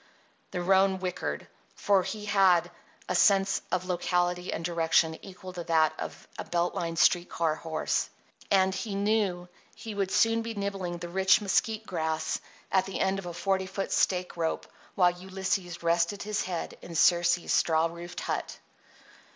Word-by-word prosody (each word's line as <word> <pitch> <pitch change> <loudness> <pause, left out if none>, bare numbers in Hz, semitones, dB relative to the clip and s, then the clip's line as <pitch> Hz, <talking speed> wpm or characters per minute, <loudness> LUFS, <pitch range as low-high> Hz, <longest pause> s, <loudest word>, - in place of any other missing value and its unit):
The 180 - -3
roan 190 +1 +4
whickered; 185 -1 -4 0.3
for 200 -2 +3
he 210 +3 -5
had 185 -4 +4 0.4
a - - -1
sense 195 +1 +4
of 185 0 0
locality 180 0 0
and 165 - -4
direction 165 -1 +2
equal 185 -1 -10
to 175 -1 -5
that 160 -2 +3
of - - -7
a - - -2
belt 175 0 -1
line 165 -1 -3
street 175 +1 +3
car 165 -2 0
horse; 160 0 -2 0.4
and 190 -1 +3
he 195 +2 -4
knew 200 -3 0 0.3
he 225 -2 -7
would 200 -2 -1
soon 225 +3 +3
be 225 0 -5
nibbling 195 -3 -3
the 175 - -6
rich 190 +2 +4
mesquite 215 +2 0
grass 160 -3 -2 0.3
at 190 0 +2
the 195 - -4
end 195 0 +1
of 185 - -7
a 175 - -5
forty 190 +1 0
foot 195 +1 -4
stake 180 -1 +1
rope 165 -1 -2 0.3
while 180 -2 +5
Ulysses 185 -1 -3
rested 170 +4 +1
his 210 0 -1
head 175 -3 -5
in 170 - -9
Circe's 175 +2 +3
straw 160 -1 +3
roofed 170 +1 -6
hut. - - -3
180 Hz, 165 wpm, -28 LUFS, 170-195 Hz, 0.4 s, while